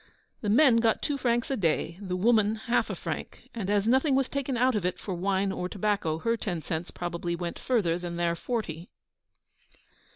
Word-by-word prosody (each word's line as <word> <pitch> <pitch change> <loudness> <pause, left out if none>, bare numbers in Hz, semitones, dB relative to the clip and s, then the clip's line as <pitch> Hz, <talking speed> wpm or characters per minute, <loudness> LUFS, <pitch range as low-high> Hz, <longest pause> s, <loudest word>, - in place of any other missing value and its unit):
The 210 - -1
men 250 +2 +6
got 225 -1 +2
two 290 - 0
francs 240 0 +1
a - - +2
day, 170 -3 0
the 185 -2 -3
woman 215 +2 +3
half 235 +2 0
a - - -3
franc; - - -6
and 210 -5 -4
as 205 0 +2
nothing 265 +3 +3
was 270 -1 +2
taken 275 -2 -2
out 255 +2 +3
of 210 -4 -1
it 180 0 -1
for 195 - -5
wine 190 +2 0
or 180 -1 -3
tobacco, 200 -6 0
her 230 +7 0
ten 180 -8 -3
cents 165 +2 -3
probably 175 0 -3
went 170 0 -5
further 185 -9 +1
than 175 -1 -5
their 170 0 0
forty. 175 -5 -4
205 Hz, 195 wpm, -28 LUFS, 175-235 Hz, -, men